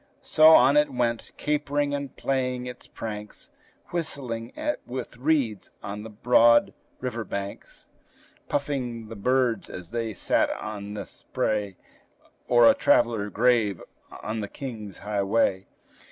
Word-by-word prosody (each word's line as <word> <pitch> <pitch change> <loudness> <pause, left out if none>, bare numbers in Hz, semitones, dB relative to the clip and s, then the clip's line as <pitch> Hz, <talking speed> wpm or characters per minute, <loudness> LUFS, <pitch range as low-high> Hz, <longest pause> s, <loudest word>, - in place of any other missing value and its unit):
So 155 0 +5
on 135 +4 +6
it 150 0 +3
went, 120 -2 -1
capering 145 -1 0
and 140 -2 -4
playing 125 -2 -1
its 125 0 -8
pranks; 105 -2 -7 0.4
Whistling 125 -9 -4 0.3
with 125 -1 -6
reeds 125 -6 0
on 100 +1 -5
the 110 - -8
broad 115 +2 +4 0.3
river 120 -3 -3
banks; 100 -1 -7 0.6
Puffing 125 -6 -2
the 115 - -7
birds, 125 +2 +1
as 90 0 -9
they 115 -3 -3
sat - - +1
on 105 -1 -6
the 100 -2 -5
spray, 100 +1 -3 0.7
Or 120 -1 +6
the - - +8
traveler 115 -4 +2
grave 110 -4 +2 0.4
on 110 +1 -3
the 105 - -3
King's 110 -6 -7
highway. 100 -1 +1
115 Hz, 125 wpm, -26 LUFS, 105-130 Hz, 0.7 s, the